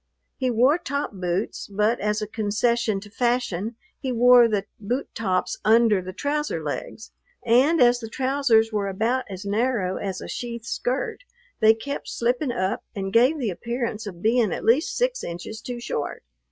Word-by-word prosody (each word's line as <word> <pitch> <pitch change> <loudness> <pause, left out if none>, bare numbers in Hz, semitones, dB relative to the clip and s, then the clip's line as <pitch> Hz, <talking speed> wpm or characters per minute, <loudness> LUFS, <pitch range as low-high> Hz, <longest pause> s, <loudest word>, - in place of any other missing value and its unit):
He 260 -2 -1
wore 255 +8 +3
top 280 -2 -3
boots, 180 +1 -3
but 210 +4 +1
as 210 +1 0
a - - -4
concession 220 0 0
to 205 - -12
fashion 235 -3 -1 0.2
he 265 - -3
wore 245 0 +7
the 205 -3 -1
boot 240 +6 -3
tops 185 -4 -1
under 220 -2 +4
the 185 +1 -7
trouser 290 - -2
legs, 155 +8 -5 0.3
and 260 +8 +4
as 245 0 +5
the 225 -2 -7
trousers 255 -3 +2
were 205 -2 0
about 225 +7 0
as 190 +1 -7
narrow 205 -3 0
as 190 -2 -4
a - - -8
sheath 235 -2 -5
skirt, 250 - -2 0.4
they 220 +1 +6
kept 280 +6 -5
slipping 245 +3 0
up 190 -5 -1
and 195 -1 -4
gave 255 +7 +5
the 240 -8 -1
appearance 235 +1 -4
of 175 -3 -9
being 225 -2 +3
at - - -4
least 290 - +2
six - - 0
inches 180 +6 -6
too 245 -1 -6
short. 150 - -4
230 Hz, 170 wpm, -24 LUFS, 205-250 Hz, 0.4 s, wore